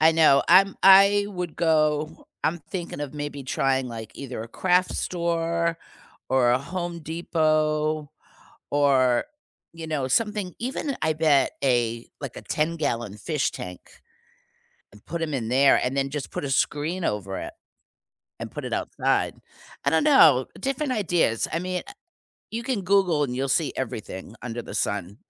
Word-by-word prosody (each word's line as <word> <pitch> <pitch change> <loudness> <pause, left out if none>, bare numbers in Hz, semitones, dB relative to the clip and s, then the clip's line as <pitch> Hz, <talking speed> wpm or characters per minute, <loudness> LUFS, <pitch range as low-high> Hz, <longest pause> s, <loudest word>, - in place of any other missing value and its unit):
I 160 +1 +6
know, 155 -4 +5
I'm 190 +2 +6
I 200 +1 +7
would 180 -5 -5
go 155 -1 +1 0.2
I'm 170 - +1
thinking 175 -6 -5
of 145 0 -5
maybe 145 -1 -5
trying, 130 -1 0
like, 115 -2 -8
either 130 -4 -6
a - - -8
craft 180 +6 +1
store 170 -1 -1 0.5
or 130 -2 +3
a 125 - +3
Home 175 +4 -5
Depot 155 -2 0 0.6
or, 135 -4 +3 0.5
you 165 -1 -8
know, 150 -4 -2
something 210 - 0
even 265 +3 -3
I 160 0 +2
bet 150 -3 +3
a 120 -3 +1
like, - - -7
a - - -8
ten-gallon 150 -10 -2
fish 150 +3 -1
tank, 90 -1 -7 1.1
and 105 - -18
put 170 0 -4
'em 155 -2 -2
in 120 -4 -2
there 135 +2 +5
and 130 +2 -1
then 135 0 0
just 145 -1 -5
put - - -4
a - - -3
screen 155 +6 0
over 100 -2 -2
it, 340 - -6 0.9
and - - -6
put - - -6
it - - -4
outside, - - 0 0.5
I - - +4
don't - - +3
know, 155 - +6
different 275 +1 -2
ideas, 175 - +1
I 165 - +1
mean, 180 0 -3
eh - - -10 0.6
you 230 - -3
can 240 -5 -2
Google 180 -5 +2
and 125 -3 -4
you'll 135 +1 -1
see 155 +3 +1
everything 110 -5 -6
under 120 -1 -4
the - - -9
sun, 100 0 -2
155 Hz, 160 wpm, -25 LUFS, 130-175 Hz, 1.1 s, I